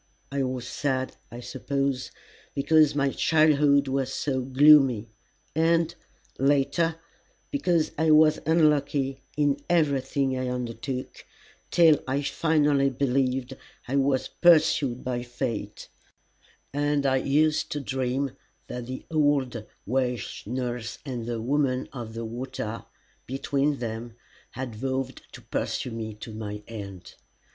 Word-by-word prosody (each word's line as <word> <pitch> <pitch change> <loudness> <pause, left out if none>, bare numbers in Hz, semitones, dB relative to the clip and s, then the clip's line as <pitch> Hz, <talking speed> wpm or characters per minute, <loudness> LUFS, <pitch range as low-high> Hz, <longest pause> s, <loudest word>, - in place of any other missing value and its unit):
I 140 0 -1
was 130 -2 -3
sad, 130 -2 -2 0.2
I 120 - -8
suppose, 135 +1 -2 0.5
because 150 +1 +4
my 140 -1 +2
childhood 150 -3 +4
was 135 -1 -1
so 135 -1 -1
gloomy, 130 -4 +5 0.4
and, 165 +1 +2 0.5
later, 145 +5 +2 0.6
because 175 - +1
I 160 0 +3
was 155 0 +6
unlucky 145 -4 +2 0.2
in 145 -2 +2
everything 140 -5 +1
I 130 0 -2
undertook, 125 +1 -5 0.5
till 160 -4 +5
I 135 +2 0
finally 145 -2 +2
believed 130 0 0 0.3
I 130 - -2
was 135 -1 +2
pursued 155 -7 +3
by 125 -1 -2
fate, 120 -2 -4 0.9
and 145 0 +1
I 130 -1 +3
used 150 +3 +2
to 150 - -2
dream 135 0 -1 0.3
that 125 -1 -6
the 130 0 -6
old 140 -7 +1 0.2
Welsh 125 -3 -2
nurse 120 -1 -3
and 120 -4 -4
the 120 -1 -2
Woman 130 +1 0
of 115 -4 -7
the 115 0 -4
Water 120 -1 -5 0.4
between 140 +2 0
them 115 -1 -5 0.4
had 130 -3 -4
vowed 130 +3 -3
to - - -11
pursue 125 - -3
me 110 -2 -5
to 110 +1 -9
my 105 -1 -6
end. 100 -5 -8
135 Hz, 120 wpm, -26 LUFS, 125-145 Hz, 0.9 s, was